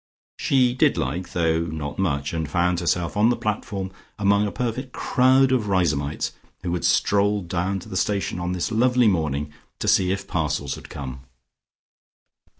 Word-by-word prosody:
She 125 -2 +3
did 140 - +3
like, 80 +5 -3
though 80 -2 +2
not 75 -2 -5
much, 75 -6 -1
and 80 -3 -2
found 90 +2 +1
herself 85 -1 0
on 105 +3 +4
the 120 - +2
platform 100 -3 -3 0.3
among 100 0 +3
a - - -4
perfect 125 +2 -3
crowd 130 +1 +3
of 120 -5 +1
Riseholmites 80 -7 0 0.3
who 85 -1 -2
had 90 - -2
strolled 100 -2 +2
down 95 +3 -1
to - - -12
the - - -7
station 100 -1 -1
on 90 +1 -2
this 90 +4 -2
lovely 125 +1 +3
morning 75 -6 0 0.2
to - - -4
see 90 -1 +4
if 100 - -3
parcels 75 -5 -1
had - - -10
come. 65 -1 -7
90 Hz, 165 wpm, -23 LUFS, 80-105 Hz, 0.3 s, on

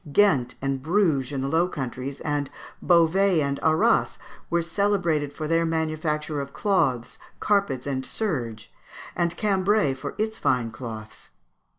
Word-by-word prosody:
Ghent 140 -10 +3
and 135 -1 -1
Bruges 155 -5 +1
in 135 -2 -2
the 135 - -1
Low 165 +5 +2
Countries, 135 -3 -5
and 145 -2 -1 0.3
Beauvais 175 +2 +4
and 140 -1 -1
Arras, 160 +9 +2 0.3
were 170 0 +1
celebrated 170 -5 0
for 155 0 -5
their 165 +1 +2
manufacture 155 -2 -1
of 140 0 -8
cloths, 135 - 0 0.2
carpets, 195 -12 +1
and 135 -2 -2
serge, 120 - -3 0.4
and 170 -1 0
Cambrai 200 -6 +2
for 140 +2 -7
its 220 +1 -2
fine 120 -3 +1
cloths. 110 -2 -8
155 Hz, 135 wpm, -25 LUFS, 135-180 Hz, 0.4 s, Beauvais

